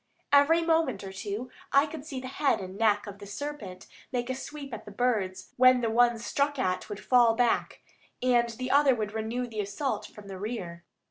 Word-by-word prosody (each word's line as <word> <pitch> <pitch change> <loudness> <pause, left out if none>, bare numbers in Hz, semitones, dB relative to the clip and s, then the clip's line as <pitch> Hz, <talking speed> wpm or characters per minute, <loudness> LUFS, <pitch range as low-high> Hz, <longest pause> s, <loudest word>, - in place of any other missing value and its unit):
Every 310 +4 +6
moment 320 -11 +1
or 190 -1 -7
two 210 +5 -5 0.2
I 275 +1 +5
could 305 -1 -8
see 270 -4 -4
the 255 - -7
head 275 +2 +1
and 185 0 -7
neck 210 -1 +2
of 200 -1 -9
the 200 - -9
serpent 205 -5 -6 0.3
make 245 0 -2
a - - 0
sweep 275 0 -8
at 220 - -7
the - - -9
birds, 205 -5 -1
when 255 0 +6
the 230 -2 0
one 240 0 +4
struck 280 +5 -1
at 185 -5 -1
would 205 -1 -5
fall 240 -3 +5
back, 240 0 +1 0.4
and 240 -2 +3
the 255 +3 -4
other 280 -2 +5
would 215 -2 -3
renew 225 +3 -2
the 225 -3 -7
assault 205 +8 -2
from 210 -1 -13
the 190 -1 -7
rear. 185 -6 -5
240 Hz, 205 wpm, -28 LUFS, 205-265 Hz, 0.4 s, Every